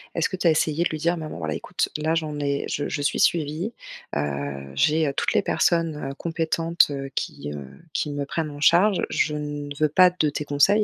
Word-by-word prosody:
Est-ce 165 - +2
que - - -4
tu 180 - -5
as - - +7
essayé 155 +1 +1
de - - +1
lui 155 - -3
dire: 170 +3 +1
«Maman, 155 - -6
voilà, 80 -2 -3
écoute - - -2
là 155 +2 0
j'en 155 -2 -2
ai 140 -1 -1
je 145 - -2
je 145 - -2
suis 140 - 0
suivi, 165 +6 +1 0.5
heu, 70 -1 -3
j'ai, 155 - +3
heu, 140 - -1
toutes - - 0
les - - +4
personnes, 160 -5 +1
heu, - - -7
compétentes, 165 +1 +1
heu, 135 -1 -4
qui, 75 +1 -4
heu, 70 -2 -7 0.3
qui 150 - -1
me 145 0 -3
prennent 155 +2 -2
en 145 - -9
charge, 180 +6 +5
je 150 -1 +1
ne 145 -1 -4
veux 155 -1 +3
pas 180 +4 +6
de 175 -4 0
tes 150 - -3
conseils» 190 +10 +4
150 Hz, 225 wpm, -24 LUFS, 140-165 Hz, 0.5 s, as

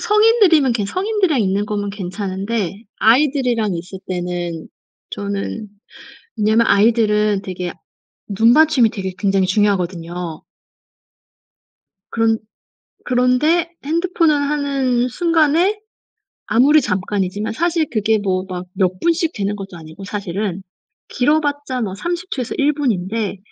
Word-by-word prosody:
성인들이면 420 - +4
성인들이랑 375 - 0
있는 200 +1 0
거면 205 -1 -2
괜찮은데 195 +1 -4 0.2
아이들이랑 245 -5 +2
있을 180 +3 -7
때는 175 -2 -4 0.4
저는 200 +1 -4 0.7
왜냐하면 220 +2 +3
아이들은 210 -2 +3
되게 180 -2 -5 0.6
눈맞춤이 235 +4 +4
되게 190 -4 -5
굉장히 195 -2 +1
중요하거든요. 180 -4 -1 1.7
그런 225 -1 +2 0.7
그런데 255 +8 +2 0.2
핸드폰을 335 -1 +2
하는 280 -4 0
순간에 335 - +2 0.7
아무리 280 +7 +4
잠깐이지만 195 +2 -2
사실 335 +2 +1
그게 220 -1 +2
뭐 190 -2 -1
막 180 0 -5
몇 185 -1 0
분씩 335 - +1
되는 205 0 -2
것도 195 -3 -8
아니고 160 +4 -11
사실은 195 -1 -4 0.5
길어봤자 285 -1 0
뭐 195 -3 -3
30 345 - -4
초에서 250 -3 -3
1 295 +1 +2
분인데 215 -6 -2
220 Hz, 270 characters per minute, -19 LUFS, 195-290 Hz, 1.7 s, 성인들이면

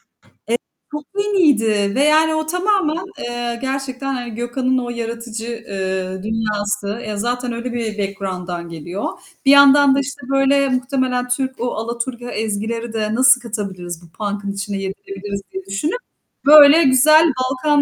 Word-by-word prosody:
Evet, - - -41 0.9
çok 300 -1 -5 0.2
yeniydi 225 - +2
ve 275 - +3
yani 315 +1 +4
o 315 0 -1
tamamen, 360 -1 0
eee, 240 0 -4
gerçekten, 270 0 -3
hani, 245 -3 -5
Gökhan'ın 255 +2 -1
o 245 -1 -2
yaratıcı, 230 -1 -5
eee, 190 -4 -4
dünyası. 210 -1 -2
Eee, 215 -1 -5
zaten 245 +3 -2
öyle 235 +1 -5
bir 225 -3 -3
background'dan 185 -3 -4
geliyor. 170 +4 -6 0.4
Bir 275 - +6
yandan 280 0 +7
da, - - +2
işte, 280 +1 -5
böyle, 275 0 +3
muhtemelen 255 -1 -1
Türk, 260 +1 -2
o 245 +1 -1
alaturka 235 +2 -4
ezgileri 225 +2 -3
de 215 0 -1
nasıl 260 0 +5
katabiliriz 190 -7 -5
bu 170 - -16
punk'ın 205 0 -4
içine 200 0 -4
yedirebiliriz 195 +1 -6
diye 190 0 -6
düşünüp, 195 - -2 0.5
böyle, 300 +2 +9
güzel 305 +4 +6
Balkan 265 +3 +1
240 Hz, 145 wpm, -19 LUFS, 205-275 Hz, 0.9 s, böyle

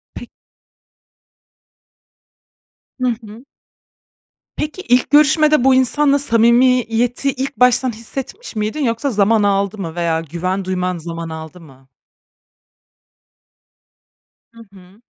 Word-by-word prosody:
P - - -9 2.7
Hı 255 - +1
hı. 225 +1 -8 1.1
Peki, 305 +5 -5
ilk 245 -5 +1
görüşmede 300 -1 +4
bu 265 0 +4
insanla 280 +2 +2
samimiyeti 245 +1 +2
ilk 270 +1 -5
baştan 250 0 +3
hissetmiş 260 - -8
miydin, 215 +8 -2
yoksa 230 +4 -1
zaman 210 0 +2
aldı 200 +1 0
mı 170 -5 -6
veya 165 -2 -1
güven 180 +4 -4
duyman 180 -1 -2
zaman 165 0 -7
aldı 160 +2 -9
mı? 135 -4 -18 2.7
Hı 230 - -15
hı. 190 +3 -18
230 Hz, 100 wpm, -17 LUFS, 185-260 Hz, 2.7 s, görüşmede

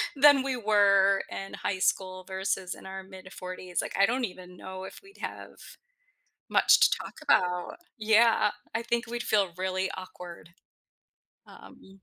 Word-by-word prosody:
than 285 0 +7
we 265 -1 -2
were 200 -3 +4
in 195 - -7
high 190 - -2
school 185 0 0
versus 190 0 -3
in - - -12
our 190 0 -7
mid-forties. 185 -1 -6
Like, - - -6
I 195 - +6
don't 245 +1 0
even 180 -2 -11
know 190 +1 -8
if 190 - -9
we'd 395 +1 -18
have - - -6 1.0
much - - +5
to - - +4
talk - - -9
about. 180 -1 +1 0.2
Yeah. 220 0 +4 0.2
I 225 - -1
think 235 0 -1
we'd 240 +1 -4
feel 200 -4 +1
really 185 0 -2
awkward. 175 -3 -10 1.0
Um, 195 0 -16
190 Hz, 150 wpm, -28 LUFS, 185-220 Hz, 1.0 s, than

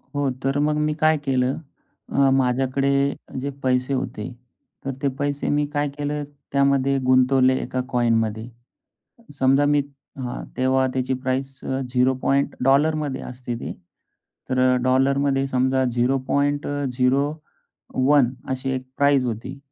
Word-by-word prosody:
हो 140 -1 +1
तर 135 +1 +1
मग 150 +1 +1
मी 150 0 +1
काय 155 0 +4
केलं, 130 0 +1 0.5
अ, 140 -1 +3
माझ्याकडे 135 +1 +1 0.5
जे 140 +2 -3
पैसे 130 +1 +1
होते, 130 -3 -3 0.5
तर 135 - -1
ते 140 - +1
पैसे 145 0 -1
मी 150 - +2
काय 145 0 0
केलं, 145 0 -2 0.3
त्यामध्ये 140 0 +2
गुंतवले 130 0 +4
एका 130 - -2
कॉइनमध्ये. 115 -2 +1 0.9
समजा, 135 +2 +4
मी 145 0 +3 0.4
हां, 125 -2 -4
तेव्हा 130 +1 +2
त्याची 130 0 -1
प्राईस 135 +1 -3
झिरो 130 -1 +1
पॉइंट 140 +1 +1
डॉलरमध्ये 145 +1 +2
असते 125 -1 -6
ती. - - -6 0.8
तर 130 0 +3
डॉलरमध्ये 135 +1 +2
समजा 130 0 +1
0.01 135 +1 0 0.2
अशी 130 0 -2
एक 130 0 -4
प्राईस 140 -2 +3
होती. 120 +4 -4
135 Hz, 120 wpm, -23 LUFS, 130-140 Hz, 0.9 s, काय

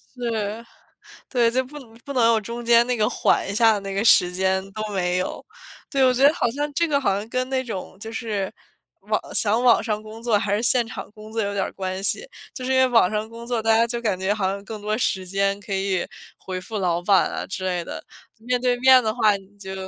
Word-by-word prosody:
对， 225 -3 -3 0.7
对， 240 -3 +3
就 260 +2 +1
不 295 +3 -10
能 235 -5 -15
不 280 - -8
能 245 -3 +3
有 220 - +1
中 235 +3 -6
间 235 0 +5
那 250 -1 0
个 210 -1 +2
缓 - - +1
一 200 - -3
下 220 -1 +4
那 195 0 -6
个 200 +2 0
时 180 -5 +5
间 190 +1 0
都 215 - -4
没 180 -2 0
有。 185 - -3 0.5
对， 275 -2 +2
我 255 - +4
觉 265 +3 +5
得 295 - +3
好 240 - 0
像 290 +3 -3
这 335 +4 +1
个 285 -3 +1
好 200 -8 +1
像 205 +2 -4
跟 255 +1 -1
那 260 -1 0
种 190 -6 -7
就 220 +1 -7
是， 215 -4 -3 0.5
网 - - -1
想 220 +2 +3
网 245 -2 +5
上 215 -2 -2
工 215 +1 -10
作 230 -3 +2
还 200 0 -1
是 210 - +1
现 245 0 +3
场 225 - -8
工 215 +1 -13
作 225 0 -1
有 200 -1 -2
点 195 -1 0
儿 - - -4
关 190 0 -5
系。 480 - 0 0.3
就 255 - -6
是 260 - -1
因 - - +3
为 260 - +6
网 230 -7 +4
上 215 +1 -3
工 230 +1 -10
作， 240 -2 -1
大 225 0 +3
家 230 +1 +3
就 235 0 -3
感 205 -5 -1
觉 190 +2 +1
好 200 -3 -1
像 200 +1 -5
更 215 -1 -7
多 215 +1 -1
时 190 -5 0
间 195 +1 0
可 200 0 -6
以 190 -2 0 0.3
回 185 -1 -6
复 215 +4 -6
老 175 -2 0
板 195 +2 +3
啊 - - -4
之 190 - -5
类 180 -2 -1
的， - - -8 0.3
面 245 +2 -1
对 250 0 +1
面 260 0 +7
的 220 -2 -1
话 215 -4 +3
你 195 -1 -17
就 190 -1 -8
220 Hz, 270 characters per minute, -23 LUFS, 195-240 Hz, 0.7 s, 面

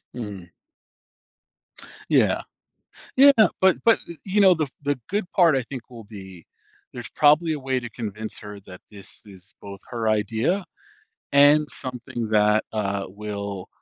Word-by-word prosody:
Mm. 105 -6 -7 1.7
Yeah. - - +3 0.8
Yeah, 280 +2 +8 0.3
but 190 -1 +4
but, 230 - +5 0.3
you 205 +1 0
know, 190 -2 +6
the 155 -2 -1 0.2
the 145 -1 -1
good 200 -2 -3
part 170 -5 +4
I 130 - 0
think 125 0 -10
will 115 -3 -11
be 95 -5 -12 0.5
there's 120 -1 -8
probably 155 +2 +3
a 155 - -3
way 130 -1 -1
to 120 -2 -8
convince 110 -1 -7
her 105 -1 -10
that 90 -1 -13
this 100 -2 -12
is 95 -1 -16
both 100 -1 -10
her 115 -2 -2
idea 110 - 0 0.7
and 145 +2 +5
something 125 -3 -6
that, 105 0 +3
uh, 100 -2 -2
will 100 -1 -6
115 Hz, 145 wpm, -23 LUFS, 100-145 Hz, 1.7 s, Yeah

